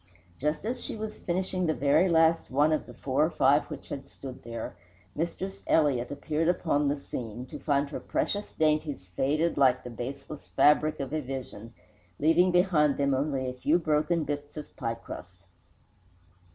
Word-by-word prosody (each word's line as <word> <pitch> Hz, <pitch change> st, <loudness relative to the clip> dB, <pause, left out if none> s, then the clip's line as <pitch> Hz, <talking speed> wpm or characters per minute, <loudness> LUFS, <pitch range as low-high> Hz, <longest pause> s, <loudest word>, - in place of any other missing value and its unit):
Just 150 Hz, +7 st, -1 dB
as 245 Hz, +2 st, -3 dB
she -, -, -4 dB
was 215 Hz, 0 st, -6 dB
finishing 185 Hz, 0 st, -1 dB
the 155 Hz, -, +1 dB
very 150 Hz, +6 st, +3 dB
last 165 Hz, 0 st, +3 dB
one 145 Hz, +4 st, +3 dB
of 155 Hz, -, 0 dB
the 125 Hz, -, -10 dB
four 135 Hz, +3 st, +1 dB
or 155 Hz, -, +2 dB
five 145 Hz, -2 st, +3 dB
which 150 Hz, -3 st, -8 dB
had 135 Hz, -, -6 dB
stood 130 Hz, -2 st, -9 dB
there, 115 Hz, -3 st, -6 dB, 0.4 s
Mistress 185 Hz, +4 st, -3 dB
Elliott 140 Hz, -6 st, +3 dB
appeared 155 Hz, +3 st, -1 dB
upon 160 Hz, -4 st, +2 dB
the 145 Hz, +1 st, +1 dB
scene, 125 Hz, -3 st, -6 dB
to -, -, -9 dB
find 145 Hz, -1 st, +1 dB
her -, -, -4 dB
precious 205 Hz, 0 st, -2 dB
dainties 150 Hz, -, 0 dB
faded 150 Hz, -, +1 dB
like 130 Hz, -2 st, +4 dB
the 125 Hz, -, -7 dB
baseless 135 Hz, +5 st, -7 dB
fabric 150 Hz, +1 st, +3 dB
of 140 Hz, +1 st, -4 dB
a 155 Hz, -, 0 dB
vision, 125 Hz, -4 st, -7 dB, 0.4 s
leaving 165 Hz, +4 st, +4 dB
behind 175 Hz, -5 st, +3 dB
them 140 Hz, -1 st, +2 dB
only 135 Hz, -1 st, 0 dB
a 125 Hz, -, -3 dB
few 145 Hz, +6 st, +2 dB
broken 155 Hz, 0 st, +1 dB
bits 145 Hz, 0 st, -5 dB
of 150 Hz, -, -8 dB
pie 115 Hz, -3 st, -2 dB
crust. 90 Hz, -5 st, -10 dB
150 Hz, 175 wpm, -28 LUFS, 135-160 Hz, 0.4 s, like